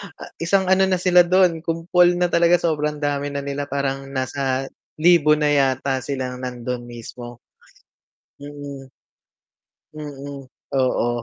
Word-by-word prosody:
ah - - -11
isang 190 +2 +1
ano 190 0 +4
na 185 - +2
sila 180 0 +4
dun 180 -2 +3
kumpol 175 +2 +2
na 175 0 0
talaga 170 +1 +4
sobrang 150 -3 -1
dami 145 0 -1
na 140 0 -4
nila 140 0 -4
parang 135 -1 -3
nasa 135 0 -2 0.2
libo 155 -2 +5
na 150 -1 +1
yata 135 -1 +1
silang 130 -2 -4
nandun 125 -1 -5
mismo. 120 0 -10 1.0
Mm. 145 -1 -9 1.1
Mm, 140 -2 -8 0.3
oo. 130 -2 +1
145 Hz, 130 wpm, -21 LUFS, 135-165 Hz, 1.1 s, libo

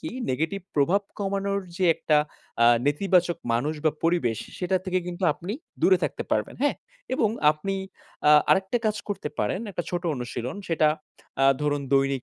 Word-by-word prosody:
কি, 315 - -5 0.2
নেগেটিভ 160 +9 -1
প্রভাব 160 +8 +3 0.2
কমানোর 200 0 -1 0.2
যে 185 - +1
একটা 155 -2 +2 0.5
আ - - +7 0.2
নেতিবাচক 175 +3 +2
মানুষ 140 +7 0
বা 155 - +5
পরিবেশ 165 -10 +2
সে - - -16
সেটা 185 +1 +1
থেকে 185 -1 +1
কিন্তু 180 +2 -6
আপনি 180 +7 -6 0.3
দূরে 185 0 +6
থাকতে - - -1
পারবেন, - - 0
হ্যাঁ? 290 - +2 0.4
এবং 225 -4 +2 0.2
আপনি 195 +6 -4 0.5
আ - - +8 0.2
আরেকটা 190 +5 +3
কাজ 210 0 +1
করতে 200 -7 -3
পারেন, 185 - 0
একটা 175 -2 -3
ছোট 175 -1 -2
অনুশীলন। 125 +2 -5
সেটা 160 -2 +3 0.5
আ - - +6 0.2
ধরুন 145 -1 0
দৈনিক 135 -1 +2
175 Hz, 165 wpm, -26 LUFS, 145-195 Hz, 0.5 s, আ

